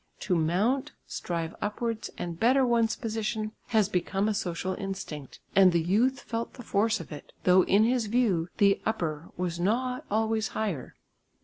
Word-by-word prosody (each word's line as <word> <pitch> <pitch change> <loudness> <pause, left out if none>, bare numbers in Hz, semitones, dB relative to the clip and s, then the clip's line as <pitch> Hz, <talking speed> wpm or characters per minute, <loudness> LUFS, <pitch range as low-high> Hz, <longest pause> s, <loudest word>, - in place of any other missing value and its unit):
To 190 - 0
mount, 190 +12 +1
strive 165 -2 -4
upwards 225 +2 -2
and 170 -1 -5
better 260 +3 +4
one's 230 -2 +2
position 220 -1 -2 0.2
has 215 -4 +3
become 195 +1 0
a 215 - +1
social 185 -1 -2
instinct, 185 -9 -6 0.2
and 190 -2 +7
the 170 - +2
youth 220 +11 +2
felt 230 0 -4
the 245 - -10
force 215 +1 +1
of 170 - -9
it, 150 - -9
though 185 +1 +6
in 205 +2 +4
his 235 -1 +2
view 205 -7 +1
the 200 -2 +4
"upper" 165 -7 -2
was 175 -1 -2
not 250 +7 0
always 220 +1 +1
higher. 195 -12 -3
205 Hz, 165 wpm, -28 LUFS, 175-225 Hz, 0.2 s, and